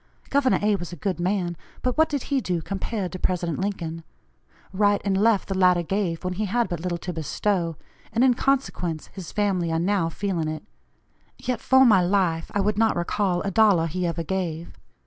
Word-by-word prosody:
Gov. 275 -2 +3
A. 210 0 +3
was 175 -1 -7
a - - -6
good 180 +3 -3
man, 180 -1 0 0.3
but 250 -1 0
what 315 0 +3
did 285 -3 -2
he 270 - +2
do 175 -6 -2
compared 195 -1 -3
to 185 - -6
President 175 -3 -1
Lincoln? 170 -4 -3 0.7
Right 205 +1 +3
and 195 -1 +1
left 210 +1 +3
the 195 - -2
latter 180 -2 +4
gave, 180 -2 -2
when 185 0 -2
he 210 +4 -2
had 230 +1 0
but 175 -3 -3
little 175 0 -2
to 175 +1 -5
bestow, 165 +2 -1 0.4
and 230 +3 +2
in 260 -1 +5
consequence 240 - -1
his 190 -4 -8
family 190 -5 0
are 160 - +1
now 175 0 +1
feeling 175 -2 -2
it; 155 0 -4 0.7
yet 250 -2 -3
for 265 0 +5
my 210 -6 +6
life 175 -3 +1
I 200 - +2
would 210 +1 0
not 225 -1 +3
recall 180 +1 0
a 200 - -2
dollar 200 -5 +4
he 175 +2 -2
ever 165 0 -2
gave. 170 -2 -3
185 Hz, 200 wpm, -24 LUFS, 170-210 Hz, 0.7 s, my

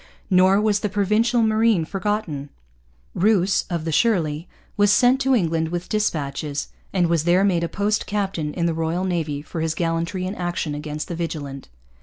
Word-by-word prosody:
Nor 185 +2 +5
was 210 -1 +2
the 210 - -2
Provincial 215 +4 +2
Marine 220 -5 +3
forgotten. 185 -7 -3 0.6
Rous, 195 0 +2
of 170 -3 -3
the 165 - -1
Shirley, 165 -5 +1 0.3
was 205 0 +4
sent 250 +5 +4
to 270 -1 +3
England 165 -6 0
with 175 +1 -4
dispatches, 150 -8 -2 0.2
and 185 -3 +2
was 165 -2 +1
there 175 +3 +3
made 180 -4 +2
a 170 - -2
post 210 +2 -1
captain 195 -7 -2
in 170 - 0
the 170 - +1
Royal 165 +3 -1
Navy 160 -6 -2
for 160 +1 -5
his 160 0 -1
gallantry 170 +2 -1
in 185 - -3
action 175 -5 -3
against 150 +1 -5
the 170 - -4
Vigilant. 150 -5 -5
175 Hz, 175 wpm, -22 LUFS, 160-205 Hz, 0.6 s, Nor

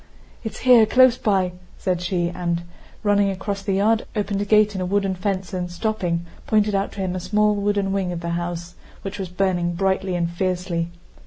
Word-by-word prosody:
"It's 220 - -6
here, 245 -4 +7
close 255 +1 +6
by," 190 -6 +1 0.3
said 180 -2 -1
she 175 -1 0
and, 170 -1 -2 0.4
running 205 -1 +3
across 195 +1 -3
the 195 0 -1
yard, 220 +3 +2
opened 205 -1 -1
a - - -1
gate 210 0 +4
in 190 - -3
a - - -1
wooden 195 0 +1
fence 190 0 -3
and, 180 -1 -3
stopping, 175 -4 -1 0.2
pointed 210 -1 +2
out 195 0 0
to 200 - -5
him 185 -1 -2
a - - -2
small 210 +3 +2
wooden 200 -1 0
wing 190 -2 -1
of 170 -1 -4
the 170 - -3
house, 175 0 -4 0.3
which 195 +1 -5
was 190 -2 -4
burning 175 -2 0
brightly 190 0 0
and 170 -1 0
fiercely. 175 -1 -1
190 Hz, 195 wpm, -22 LUFS, 175-205 Hz, 0.4 s, here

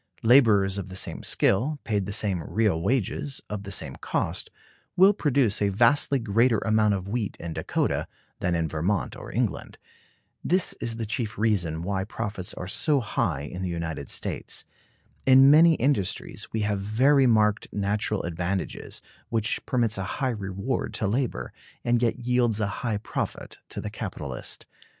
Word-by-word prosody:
Laborers 110 -6 +5
of 95 -1 -6
the 95 - -8
same - - -2
skill, 130 +10 +2
paid 100 -4 -1
the - - -3
same 100 -4 0
real 100 -1 0
wages, 130 - -1
of 105 -1 -3
the 100 0 -8
same 80 -8 -3
cost, - - -2 0.5
will 190 +3 +7
produce 140 - +1
a 100 - +3
vastly 120 +7 +3
greater 115 +1 +2
amount 110 -1 +2
of 95 -1 -5
wheat 105 -1 -2
in 85 -1 -5
Dakota - - -1 0.3
than 90 -1 0
in 85 -1 0
Vermont 85 +7 -1
or - - -9
England. - - -2 0.7
This 185 +1 +2
is 115 -1 -2
the 115 -1 -3
chief 115 0 -3
reason 90 -7 0
why 95 +1 -1
profits 95 -1 -5
are 90 - -6
so 145 - +1
high 105 - -1
in 80 +6 -6
the 95 - -2
United 85 -5 -4
States. - - -4 0.6
In 135 +1 +8
many 165 +2 +7
industries 125 -9 -1
we 110 - -1
have 105 -1 0
very 130 +7 +4
marked 105 -2 +2
natural 105 +1 -1
advantages, 90 +3 -3 0.3
which 115 0 -1
permits 115 -6 +1
a - - -1
high 135 -3 0
reward 100 +2 -3
to 110 - -1
labor, 120 +5 -1 0.3
and 120 0 +2
yet 120 0 0
yields 120 -3 +2
a 105 - +1 0.2
high 115 -4 0
profit 105 - -5
to - - -5
the - - -5
capitalist. - - -6
105 Hz, 165 wpm, -26 LUFS, 95-120 Hz, 0.7 s, In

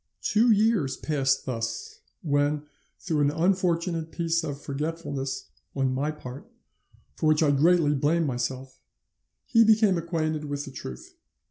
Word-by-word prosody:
Two 225 +3 +3
years 210 - +3
passed 135 -3 0
thus, 115 -3 -4 0.2
when, 145 0 +1 0.3
through 160 -4 -2
an 145 - +4
unfortunate 170 -1 0
piece 170 0 0
of 145 -3 -4
forgetfulness 140 -2 -4 0.2
on 135 -2 +1
my 140 +3 -1
part, 140 -3 -9 0.6
for - - 0
which 155 +1 +4
I 145 - +4
greatly 155 +1 +4
blame 155 +4 +1
myself, 130 0 -4 0.7
he 230 -1 +5
became 215 -4 +4
acquainted 160 -2 -2
with 145 0 -4
the 135 - -9
truth. 230 - -9
150 Hz, 135 wpm, -26 LUFS, 135-170 Hz, 0.7 s, he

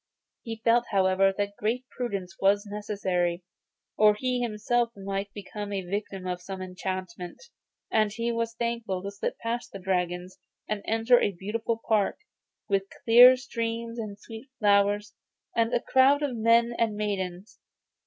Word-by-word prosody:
He 225 -1 -6
felt, 240 +1 +4
however, 195 0 +3
that 205 0 -2
great 235 +4 -1
prudence 200 -7 -4
was 200 +2 +3
necessary, 190 -4 -2 0.5
or 210 0 +5
he 250 +2 -1
himself 235 +1 0
might 195 +1 -4
become 205 0 -7
the 195 -2 -3
victim 195 0 -4
of 180 -1 -3
some 190 +1 -7
enchantment; 185 -1 -5 0.5
and 215 -1 +3
he 230 +2 -2
was 230 0 -2
thankful 230 -6 -2
to 200 - -4
slip 200 - -4
past 235 +1 -4
the - - -7
dragons, 180 -1 -2 0.3
and 210 -1 -2
enter 225 +2 +4
a 200 - +1
beautiful 220 +5 -3
park, 215 -3 +2 0.5
with 195 -1 +1 0.2
clear 245 +2 +9
streams 230 -2 -4
and 210 -3 -5
sweet 225 +5 -11
flowers, 205 0 +2 0.4
and 230 0 +2
a - - +2
crowd 270 +4 +4
of 275 -4 -1
men 230 +1 +3
and 225 -2 +1
maidens. 195 -2 -4
210 Hz, 150 wpm, -27 LUFS, 195-230 Hz, 0.5 s, clear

